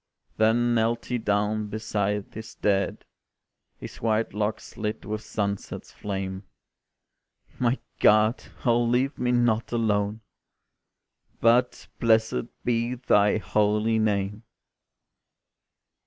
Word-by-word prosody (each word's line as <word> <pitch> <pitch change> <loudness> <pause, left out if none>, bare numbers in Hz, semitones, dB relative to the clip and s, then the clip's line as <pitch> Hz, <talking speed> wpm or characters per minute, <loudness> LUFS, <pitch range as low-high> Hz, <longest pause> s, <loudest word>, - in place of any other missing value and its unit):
Then 120 +2 +3
knelt 115 +1 +1
he 125 -1 -2
down 105 0 0
beside 105 -1 -2
his 110 +1 -9
dead, 100 -1 0 0.7
His - - -9
white 110 -1 0
locks 105 +1 -3
lit 105 0 -4
with 105 0 -3
sunset's 100 -3 -4
flame: 95 -2 -4 1.2
"My 125 +1 +2 0.2
God! 110 +3 +4 0.2
oh 120 -1 +4
leave 125 +4 +1
me 125 0 +1
not 120 -2 +1
alone 105 -2 0 1.2
But 120 +2 +2
blessed 110 - +2 0.2
be 120 +1 0
Thy 105 -4 +3
holy 105 +1 +1
name." 105 -1 0
110 Hz, 100 wpm, -26 LUFS, 105-115 Hz, 1.2 s, God